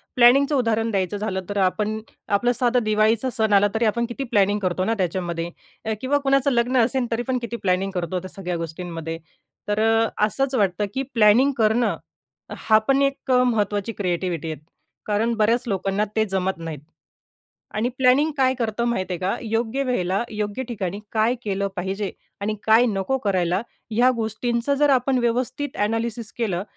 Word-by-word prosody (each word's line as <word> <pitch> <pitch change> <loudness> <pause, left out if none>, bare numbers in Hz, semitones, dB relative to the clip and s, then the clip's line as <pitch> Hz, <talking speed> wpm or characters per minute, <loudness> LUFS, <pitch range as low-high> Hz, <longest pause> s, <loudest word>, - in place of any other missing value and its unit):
प्लॅनिंगचं 275 +4 +5
उदाहरण 225 -2 +1
द्यायचं 195 0 -1
झालं 190 -2 -2
तर 205 - -3
आपण, 215 +3 0 0.3
आपलं 220 +4 +2
साधं 245 -1 +2
दिवाळीचा 215 +3 +2
सण 220 -2 +2
आला 200 +1 +5
तरी 225 +1 +2
आपण 235 +2 +1
किती 255 +3 -4
प्लॅनिंग 205 -4 +2
करतो 185 -2 -1
ना 225 - +1
त्याच्यामध्ये 175 -2 -2 0.5
किंवा 280 +3 +2
कुणाचं 275 0 +3
लग्न 245 +1 +1
असेल 250 +2 0
तरी 230 - 0
पण 260 -1 +1
किती 235 0 -4
प्लॅनिंग 190 +1 +1
करतो 180 0 -2
त्या 185 +1 -9
सगळ्या 180 -3 -3
गोष्टींमध्ये. 165 0 -5 0.5
तर 210 +1 0
अ, 225 +1 +3 0.2
असंच 270 +4 -1
वाटतं 200 -1 +1
की 270 - -1
प्लॅनिंग 230 +5 +5
करणं, 225 +1 +2 0.6
हा 215 - +4
पण 275 0 +3
एक 275 -1 -1
महत्वाची 225 -4 +2
क्रिएटिव्हिटी 175 -4 -2
आहे. 155 - -7 0.5
कारण 215 +3 +1
बऱ्याच 230 +3 +2
लोकांना 195 +1 0
ते 220 0 +3
जमत 190 0 -1
नाहीत. 165 -3 -6 1.0
आणि 220 +3 0
प्लॅनिंग 265 +5 +4
काय 260 -1 +3
करतो 235 -1 -2
माहितीये 185 -7 -1
का, 185 +1 0
योग्य 225 +4 -1
वेळेला, 195 -5 0
योग्य 210 +3 -3
ठिकाणी 200 -3 -4
काय 220 +2 +2
केलं 200 -1 -1
पाहिजे? 190 +2 -2 0.3
आणि 215 +2 -1
काय 225 +3 +5
नको 215 +5 -1
करायला? 185 0 +1 0.3
ह्या 240 +4 +4
गोष्टींचा 235 +4 -1
जर 290 +1 +3
आपण 260 0 +2
व्यवस्थित 250 +4 -1
ॲनालिसिस 225 +1 -2
केलं, 195 -6 -1
220 Hz, 165 wpm, -23 LUFS, 195-245 Hz, 1.0 s, प्लॅनिंगचं